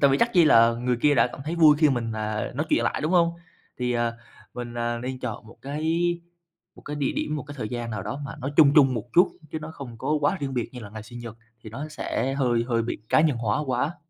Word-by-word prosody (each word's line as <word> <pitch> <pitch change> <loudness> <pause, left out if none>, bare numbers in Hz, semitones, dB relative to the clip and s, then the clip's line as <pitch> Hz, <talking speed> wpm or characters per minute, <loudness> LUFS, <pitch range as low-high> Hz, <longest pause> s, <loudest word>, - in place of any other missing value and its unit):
tại 140 - +5
vì 135 - +2
chắc 235 - +3
chi 175 -3 +6
là 115 -5 +6
người 125 +1 -1
kia 150 -1 +5
đã 115 -2 +4
cảm 125 - -9
thấy 160 +3 -2
vui 155 -3 +6
khi 155 -1 +5
mình, 120 -3 -1
à, 110 0 -3
nói 150 +5 -2
chuyện - - +2
lại, - - -1
đúng 155 +4 0
hông? 170 -2 +4 0.5
Thì, 125 0 0
à, 120 -1 0 0.4
mình, 120 -1 -6
à, 120 0 -1
nên 130 +2 -5
chọn 115 -3 -5
một 110 - -15
cái 145 +3 -4 0.9
một - - -16
cái 150 - -6
địa 140 -2 0
điểm, 150 - -2
một 145 - -4
cái 145 -1 -10
thời 110 - -3
gian 120 0 -4
nào 105 -3 -4
đó 140 - -5
mà 135 - -6
nó 135 - -3
chung 145 -3 +7
chung 135 -4 +6
một 110 -3 -3
chút, 175 - +6 0.2
chứ 160 - -2
nó 155 +1 -8
không 130 -7 -9
có 135 - -3
quá 145 +6 +2
riêng 135 -2 -3
biệt 120 -2 -1
như 125 - -8
là 105 -3 -9
ngày 110 0 -8
sinh 120 +3 -10
nhật, 115 -2 -8 0.3
thì 110 - -8
nó 140 +7 -6
sẽ 135 -3 -2
hơi 120 -4 +1
hơi 115 -2 +1
bị 115 - -3
cá - - +4
nhân 155 -5 +2
hóa 115 0 0
quá. 140 +7 -1
130 Hz, 275 wpm, -25 LUFS, 115-150 Hz, 0.9 s, chung